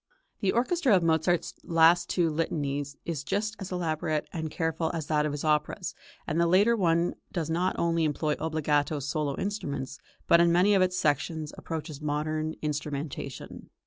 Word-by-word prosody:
The 195 Hz, -3 st, +1 dB
orchestra 260 Hz, -, +2 dB
of 180 Hz, -, +2 dB
Mozart's 165 Hz, +1 st, +2 dB
two -, -, -22 dB
last 170 Hz, +2 st, +4 dB
Litanies 145 Hz, -4 st, -1 dB
is 160 Hz, -4 st, -3 dB
just 210 Hz, +8 st, -1 dB
as 195 Hz, -2 st, -6 dB
elaborate 155 Hz, -3 st, -1 dB
and 160 Hz, -2 st, -3 dB
careful 160 Hz, 0 st, -1 dB
as 160 Hz, -2 st, -3 dB
that 150 Hz, 0 st, +1 dB
of -, -, -2 dB
his 145 Hz, 0 st, -4 dB
operas, 155 Hz, +4 st, 0 dB, 0.3 s
and 165 Hz, +1 st, 0 dB
the 170 Hz, -, +3 dB
later 200 Hz, +7 st, +4 dB
one 170 Hz, -4 st, +2 dB, 0.2 s
does 165 Hz, -3 st, -2 dB
not 180 Hz, +3 st, +1 dB
only 170 Hz, -1 st, +1 dB
employ 150 Hz, 0 st, 0 dB
obbligato 155 Hz, -1 st, 0 dB
solo 140 Hz, 0 st, -2 dB
instruments, 145 Hz, -9 st, -4 dB, 0.3 s
but 170 Hz, -, +6 dB
in 170 Hz, 0 st, +4 dB
many 185 Hz, +4 st, +4 dB
of 195 Hz, -, +4 dB
its 185 Hz, 0 st, +2 dB
sections 155 Hz, 0 st, 0 dB
approaches 155 Hz, -3 st, -6 dB
modern 155 Hz, +1 st, -2 dB
instrumentation. 145 Hz, -2 st, -5 dB
160 Hz, 165 wpm, -28 LUFS, 150-175 Hz, 0.3 s, but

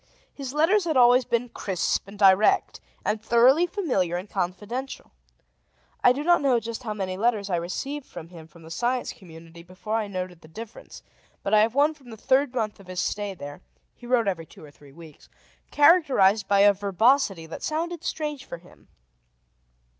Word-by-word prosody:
His 270 Hz, -3 st, -7 dB
letters 335 Hz, +7 st, +2 dB
had 315 Hz, -5 st, 0 dB
always 245 Hz, 0 st, +5 dB
been 235 Hz, +1 st, -1 dB
crisp 190 Hz, -3 st, -2 dB
and 200 Hz, +1 st, -12 dB
direct, 195 Hz, +1 st, +3 dB, 0.3 s
and 210 Hz, 0 st, -1 dB
thoroughly 250 Hz, +9 st, +4 dB
familiar 220 Hz, -, -1 dB
and 185 Hz, +3 st, -7 dB
confidential. 205 Hz, +8 st, -5 dB, 0.9 s
I -, -, +7 dB
do 275 Hz, +4 st, -2 dB
not 345 Hz, 0 st, +4 dB
know 260 Hz, -4 st, +3 dB
just 230 Hz, +1 st, -6 dB
how 215 Hz, -4 st, -5 dB
many 185 Hz, -2 st, -4 dB
letters 210 Hz, -2 st, 0 dB
I 175 Hz, -, +1 dB
received 270 Hz, +12 st, -5 dB
from 165 Hz, -, -10 dB
him 165 Hz, -3 st, -12 dB
from 165 Hz, +1 st, -18 dB
the 160 Hz, -, -12 dB
Science 245 Hz, +7 st, -2 dB
Community 165 Hz, -2 st, -14 dB
before 185 Hz, +5 st, -5 dB
I 215 Hz, -2 st, -2 dB
noted 185 Hz, -3 st, -6 dB
the -, -, -15 dB
difference, 220 Hz, +7 st, -11 dB, 0.4 s
but 200 Hz, -, -2 dB
I 215 Hz, -, +7 dB
have 225 Hz, +3 st, +1 dB
one 295 Hz, +2 st, +3 dB
from 275 Hz, -5 st, -18 dB
the 220 Hz, -, -10 dB
third 265 Hz, +4 st, +2 dB
month 215 Hz, -4 st, -2 dB
of 195 Hz, -, -16 dB
his 185 Hz, -1 st, -5 dB
stay 205 Hz, -1 st, -2 dB
there 145 Hz, +1 st, -9 dB, 0.3 s
(he 240 Hz, -, -14 dB
wrote 240 Hz, -3 st, +2 dB
every 165 Hz, -4 st, -2 dB
two -, -, -16 dB
or 145 Hz, -, -15 dB
three 145 Hz, -1 st, -18 dB
weeks), 160 Hz, 0 st, -15 dB, 0.4 s
characterized 280 Hz, -, +4 dB
by 200 Hz, -1 st, +3 dB
a 205 Hz, 0 st, +6 dB
verbosity 200 Hz, -1 st, +1 dB
that 160 Hz, -, -9 dB
sounded 330 Hz, +2 st, -3 dB
strange 300 Hz, -4 st, -4 dB
for -, -, -8 dB
him. 175 Hz, +2 st, -21 dB
215 Hz, 185 wpm, -25 LUFS, 185-260 Hz, 0.9 s, I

